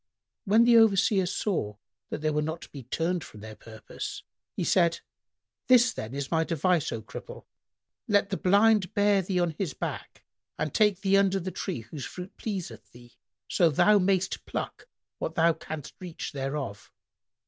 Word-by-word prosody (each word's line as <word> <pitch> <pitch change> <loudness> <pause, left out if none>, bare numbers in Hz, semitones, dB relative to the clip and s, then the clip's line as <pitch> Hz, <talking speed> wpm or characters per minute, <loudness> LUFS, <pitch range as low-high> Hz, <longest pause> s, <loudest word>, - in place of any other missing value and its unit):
When 220 +3 +5
the 235 0 +6
Overseer 200 -3 +4
saw 165 - -2 0.3
that - - -5
they 155 0 +1
were 150 0 0
not 160 +2 -4
to - - -13
be 140 - -8
turned 165 +7 -2
from 105 - -12
their 110 0 -9
purpose, 110 -1 -8 0.3
he - - -2
said, 170 -2 +2 0.7
"This, 250 -1 +5
then, 110 +5 -6
is 140 -1 -4
my 165 -1 +2
device, 165 0 +1
O 110 - -5
Cripple, - - -10 0.6
let 205 -1 +2
the 195 - 0
Blind 200 0 +3
bear 205 -1 +4
thee 185 0 -1
on 175 -1 +1
his 185 -8 -2
back - - -6 0.3
and 150 -1 -2
take 210 -3 +3
thee 195 -1 +3
under 195 -1 +3
the 185 +1 -5
tree 180 - -4
whose 125 +5 -8
fruit 180 +7 -8
pleaseth 120 - -6
thee, 120 +1 -16 0.3
so 170 -3 +3
thou 205 +8 +4
mayst 190 0 0
pluck - - -5 0.3
what 160 - -4
thou 165 0 +4
canst 155 -2 -8
reach 180 -3 -6
thereof." 135 -6 -5
175 Hz, 170 wpm, -27 LUFS, 145-195 Hz, 0.7 s, the